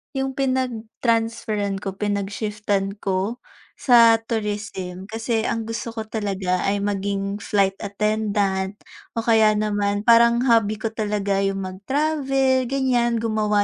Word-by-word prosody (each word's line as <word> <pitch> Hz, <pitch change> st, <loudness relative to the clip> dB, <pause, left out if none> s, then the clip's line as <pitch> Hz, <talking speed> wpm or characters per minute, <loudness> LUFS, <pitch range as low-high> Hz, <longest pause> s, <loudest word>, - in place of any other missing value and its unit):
'Yung 265 Hz, 0 st, -2 dB
pinag-transferan 230 Hz, -5 st, -1 dB
ko, 195 Hz, -1 st, -5 dB
pinag-shiftan 205 Hz, 0 st, -2 dB
ko 195 Hz, +5 st, -2 dB, 0.4 s
sa 230 Hz, -3 st, +6 dB
Tourism. 205 Hz, -4 st, -4 dB
Kasi' 225 Hz, 0 st, -1 dB
ang 230 Hz, -1 st, -1 dB
gusto 230 Hz, +1 st, -5 dB
ko 220 Hz, -, -3 dB
talaga, 195 Hz, -4 st, -2 dB
ay 200 Hz, 0 st, 0 dB
maging 200 Hz, 0 st, -2 dB
flight 195 Hz, -1 st, 0 dB
attendant 205 Hz, -2 st, -1 dB, 0.4 s
o 230 Hz, -, -1 dB
kaya 220 Hz, -2 st, +4 dB
naman 205 Hz, -1 st, 0 dB
parang 235 Hz, +1 st, +5 dB
hobby 225 Hz, -3 st, +3 dB
ko 220 Hz, 0 st, -3 dB
talaga 205 Hz, -3 st, -1 dB
'yung 195 Hz, -1 st, -1 dB
mag-travel 265 Hz, +5 st, 0 dB
ganyan. 245 Hz, -3 st, +1 dB
Gumawa 210 Hz, -2 st, +1 dB
215 Hz, 120 wpm, -22 LUFS, 200-230 Hz, 0.4 s, sa